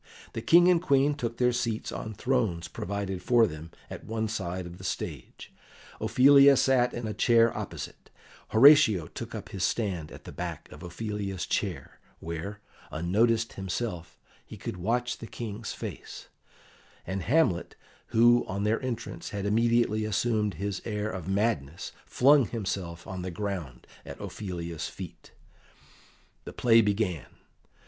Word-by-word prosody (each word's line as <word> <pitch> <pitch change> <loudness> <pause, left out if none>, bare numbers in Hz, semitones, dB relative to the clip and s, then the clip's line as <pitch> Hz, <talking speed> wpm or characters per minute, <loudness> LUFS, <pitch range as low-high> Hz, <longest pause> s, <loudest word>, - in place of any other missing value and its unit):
The - - -4
King 175 +1 +6
and 180 -2 +4
Queen 140 -3 +3
took 120 -5 -4
their 125 0 +3
seats 115 -2 -2
on 110 -1 -6
thrones 110 -9 0
provided 95 -1 -4
for 120 -2 +4
them 80 -4 -7 0.2
at - - -8
one 110 0 -2
side 95 -4 -4
of 85 +1 -10
the - - -11
stage; - - -6 0.5
Ophelia 140 +1 +6
sat 125 -2 +3
in 120 - -5
a 110 - -3
chair 115 0 +4
opposite; - - -7 0.4
Horatio 110 - +6
took - - -8
up - - -7
his 95 -2 -4
stand 90 -10 -1
at - - -11
the - - -9
back - - -6
of 75 - -12
Ophelia's 100 +1 -4
chair, - - -3 0.2
where, 85 +5 -6 0.3
unnoticed 110 +8 +1
himself, 95 -2 -4 0.3
he 110 - -11
could 115 +1 -5
watch 120 +7 -1
the 115 - -8
King's 110 -3 -6
face; - - -8 0.8
and 95 +1 -3
Hamlet, 115 - +1 0.3
who 120 +1 +5
on 100 +2 -3
their 105 +2 +1
entrance 115 -9 -5
had 100 -2 -4
immediately 115 0 +2
assumed 110 -1 0
his 100 -1 -3
air 105 -1 -3
of 95 -3 -6
madness, 95 -7 -1 0.2
flung 135 -1 +5
himself 95 -6 -4
on 95 -1 -6
the 95 - -4
ground 90 -9 -5 0.2
at - - -9
Ophelia's 85 -5 -5
feet. - - -10 1.1
The - - -8
play 115 -2 +5
began. 100 - -1
105 Hz, 145 wpm, -28 LUFS, 90-120 Hz, 1.1 s, King